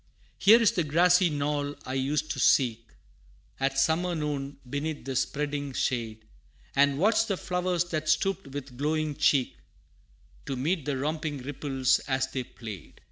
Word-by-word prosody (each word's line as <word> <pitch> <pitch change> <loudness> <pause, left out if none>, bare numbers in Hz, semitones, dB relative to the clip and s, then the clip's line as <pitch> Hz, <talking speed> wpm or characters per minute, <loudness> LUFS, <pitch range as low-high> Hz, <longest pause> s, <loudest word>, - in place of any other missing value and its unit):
Here 220 +4 +7
is 230 - +4
the 185 -7 0
grassy 175 +4 +4
knoll 145 -1 -2
I 130 - -4
used 145 +3 -1
to - - -4
seek 115 -4 +3 0.7
At 135 0 0
summer 170 +5 +2
noon, 145 -2 -3
beneath 145 +3 -4
the 135 -1 -4
spreading 145 +1 -2
shade, 115 -4 -2 0.5
And 140 0 +4
watch 215 +6 +3
the 195 - -1
flowers 180 -1 0
that 155 -1 -2
stooped 195 +3 +1
with 135 -2 -8
glowing 155 0 0
cheek, 140 -3 +2 0.9
To 135 - -2
meet 155 +4 -1
the 140 -2 -1
romping 150 -1 -3
ripples 135 -1 0
as 130 -1 +1
they 130 -1 -2
played. 110 -7 -10
145 Hz, 150 wpm, -28 LUFS, 135-160 Hz, 0.9 s, Here